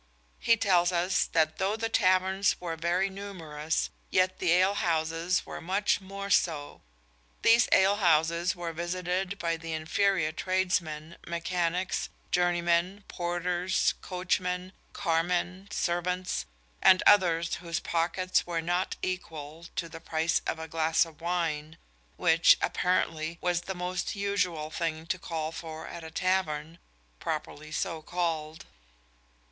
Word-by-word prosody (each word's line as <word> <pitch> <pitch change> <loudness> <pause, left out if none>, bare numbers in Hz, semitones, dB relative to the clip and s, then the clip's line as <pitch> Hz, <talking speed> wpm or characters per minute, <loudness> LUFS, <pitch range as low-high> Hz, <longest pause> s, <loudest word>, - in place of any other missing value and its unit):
He 230 - +4
tells 180 -4 +3
us 180 +1 +2
that 160 -1 +1
though 195 +2 +1
the 225 0 -1
taverns 190 -2 +3
were 170 -2 -4
very 175 +4 +1
numerous 165 -6 -3 0.2
yet 185 0 +2
the 180 -3 +2
ale 185 +3 +4
houses 165 0 0
were - - -7
much 195 +5 +1
more 200 +1 -6
so. 150 -7 +1 0.6
These 230 +1 +5
ale 195 +2 +5
houses 170 -1 +2
were 170 -1 -4
visited 180 +3 -2
by 165 -2 -1
the 165 0 -6
inferior 160 +1 +1
tradesmen, 170 -3 -1
mechanics, 175 +1 -1 0.2
journeymen, 175 +2 +1
porters, 175 +1 0
coachmen, 180 0 -2 0.2
carmen, 175 +3 -1
servants, 180 +1 -1 0.3
and 185 -1 +6
others 175 -4 +5
whose 170 0 -3
pockets 175 +2 0
were 170 -1 -1
not 175 +3 -1
equal 165 -3 -5
to 165 - -2
the 165 0 -10
price 165 0 0
of - - -1
a 160 0 -6
glass 160 +1 +2
of 165 -1 -15
wine, 165 -2 -2 0.4
which, - - +5
apparently, 165 -2 0
was 175 -1 0
the 190 +2 -5
more 180 +1 -4 0.2
usual 185 -6 -1
thing 160 -1 -2
to 185 +2 -2
call 160 -2 -3
for 160 -1 -7
at 170 - -8
a 160 - -7
tavern, 165 -2 -1 0.4
properly 155 -1 -4
so 160 +1 -2
called. 160 -2 -3
175 Hz, 130 wpm, -29 LUFS, 165-185 Hz, 0.6 s, and